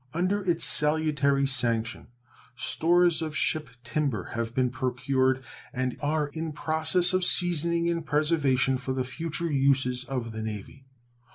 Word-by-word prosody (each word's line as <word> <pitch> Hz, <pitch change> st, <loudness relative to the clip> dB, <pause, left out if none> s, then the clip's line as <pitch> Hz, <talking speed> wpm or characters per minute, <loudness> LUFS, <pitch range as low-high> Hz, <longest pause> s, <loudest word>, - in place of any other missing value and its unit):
Under 190 Hz, +4 st, 0 dB
its 170 Hz, -1 st, +1 dB
salutary 150 Hz, -2 st, +1 dB
sanction 120 Hz, -3 st, -1 dB, 0.5 s
stores 170 Hz, +5 st, +2 dB
of 155 Hz, -1 st, -3 dB
ship 155 Hz, -1 st, 0 dB
timber 130 Hz, -5 st, -2 dB
have 115 Hz, 0 st, -3 dB
been 125 Hz, -2 st, +1 dB
procured 130 Hz, +1 st, 0 dB, 0.3 s
and 130 Hz, 0 st, -2 dB
are 150 Hz, 0 st, 0 dB
in 160 Hz, +1 st, -5 dB
process 160 Hz, +4 st, +1 dB
of 185 Hz, 0 st, +1 dB
seasoning 170 Hz, -1 st, +3 dB
and 170 Hz, -1 st, -1 dB
preservation 145 Hz, -4 st, +1 dB
for 130 Hz, 0 st, -3 dB
the 130 Hz, -, -1 dB
future 165 Hz, +5 st, -4 dB
uses 135 Hz, -2 st, +1 dB
of 125 Hz, -3 st, -4 dB
the 110 Hz, 0 st, -6 dB
Navy. 110 Hz, +5 st, -7 dB
145 Hz, 135 wpm, -27 LUFS, 130-160 Hz, 0.5 s, seasoning